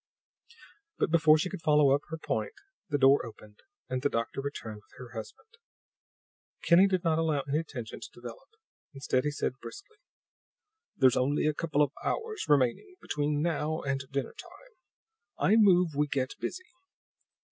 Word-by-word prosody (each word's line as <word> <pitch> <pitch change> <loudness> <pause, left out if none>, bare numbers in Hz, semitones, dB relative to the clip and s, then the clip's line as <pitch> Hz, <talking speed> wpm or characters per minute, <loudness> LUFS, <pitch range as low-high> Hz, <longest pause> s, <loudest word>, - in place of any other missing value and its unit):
But - - 0
before 160 -2 +6
she 155 - -1
could 190 - -6
follow 150 -3 +4
up 140 - +2
her 160 - -4
point 300 - -3 0.4
the 145 - +1
door 135 +1 +5
opened 110 -2 -12 0.3
and 130 0 -3
the 145 - +1
doctor 115 +3 -2
returned 115 -6 -6
with 100 -1 -20
her 125 -1 -10
husband. 110 - -9 1.1
Kinney 180 +3 +6
did 185 -2 0
not 165 -2 +2
allow 155 -3 +1
any 145 +4 -1
tension 120 -8 -8
to - - -9
develop; 120 - -11 0.5
instead, 135 -1 0
he - - +2
said 140 -3 -3
briskly: 405 +2 -11 1.0
"There's 130 -2 +4
only 140 +4 +1
a 155 - +2
couple 150 -1 +1
of 140 - -1
hours 445 - -3
remaining 145 - +2
between 145 0 -1
now 155 -1 -1
and 135 -1 -1
dinner 140 -1 -3
time; 380 +7 -14 0.7
I 205 - +3
move 185 -5 +5
we 150 +1 +1
get 130 -2 -1
busy." 370 0 -6
150 Hz, 160 wpm, -29 LUFS, 135-170 Hz, 1.1 s, before